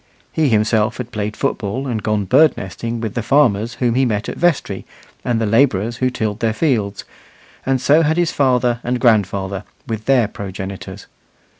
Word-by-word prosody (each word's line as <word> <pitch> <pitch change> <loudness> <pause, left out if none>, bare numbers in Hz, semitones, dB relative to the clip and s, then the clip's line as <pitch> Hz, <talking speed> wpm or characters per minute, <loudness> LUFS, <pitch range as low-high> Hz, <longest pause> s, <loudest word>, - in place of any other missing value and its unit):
He 155 -3 +1
himself 110 0 +2
had 125 -1 -6
played 105 -2 -3
football 125 -1 -2
and 115 -5 -2
gone 105 -1 0
bird 140 +10 +4
nesting 115 +5 -5
with 110 -2 -3
the 120 - -2
farmers 115 -2 +2
whom 120 -2 +1
he 130 +3 +2
met 110 -4 -1
at - - -5
vestry 175 -3 0 0.4
and 120 -2 0
the 115 - 0
labourers 115 -1 +2
who 130 - +1
tilled 110 -4 -3
their 115 -1 +1
fields, 110 -8 -1 0.6
and 135 -1 +2
so 145 +5 +4
had 160 +1 +1
his 175 -1 +2
father 125 -3 +2
and 125 +1 -1
grandfather, 100 -4 +1 0.2
with 110 -1 -5
their 130 -5 +3
progenitors. 95 0 -7
115 Hz, 175 wpm, -19 LUFS, 105-130 Hz, 0.6 s, bird